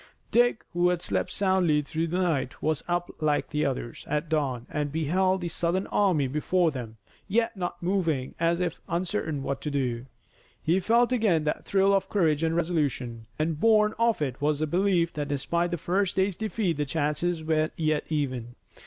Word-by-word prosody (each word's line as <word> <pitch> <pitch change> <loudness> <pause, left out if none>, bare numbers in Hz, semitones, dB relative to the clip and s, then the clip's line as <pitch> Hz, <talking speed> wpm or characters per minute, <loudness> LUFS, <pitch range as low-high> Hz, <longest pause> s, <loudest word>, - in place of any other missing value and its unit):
Dick, 240 -1 +3
who 175 +1 +3
had 180 -1 -1
slept 95 -2 -1
soundly 185 -6 +2
through 160 +3 -2
the 175 +3 -1
night, 160 -8 0
was 155 0 -1
up 175 0 -1
like 150 -1 +2
all - - -32
the 150 0 0
others 125 -4 -3
at 150 +1 -1
dawn 135 -6 -1
and 150 -1 -1
he 160 +3 -2
beheld 185 +4 +2
the 175 - -2
Southern 170 +3 -1
army 180 -9 +2
before 160 +5 +1
them, 120 -5 -7 0.3
yet 230 +3 +1
not 175 -2 -4
moving, 165 -8 0
as 170 +1 +2
if 175 -2 -2
uncertain 170 -5 -2
what 135 0 -3
to 150 - -3
do. 130 -3 -2 0.5
He 170 +4 +2
felt 235 +6 +3
again 210 -10 +2
that 150 - -2
thrill 195 0 +3
of 195 - +1
courage 160 -7 +2
and 165 0 +1
resolution, 140 -9 -1
and, 155 0 -1
born 215 0 +4
of 230 -8 +2
it, 135 -1 -4
was 150 0 +2
the 155 - 0
belief 175 0 +1
that 145 -1 -3
despite 170 +5 0
the 175 - -2
first 185 +4 0
day's 190 0 +1
defeat 215 -5 -1
the 150 - 0
chances 160 +3 -1
were 155 0 +1
yet 155 -2 +1
even. 130 -6 -2
165 Hz, 190 wpm, -27 LUFS, 145-185 Hz, 0.5 s, born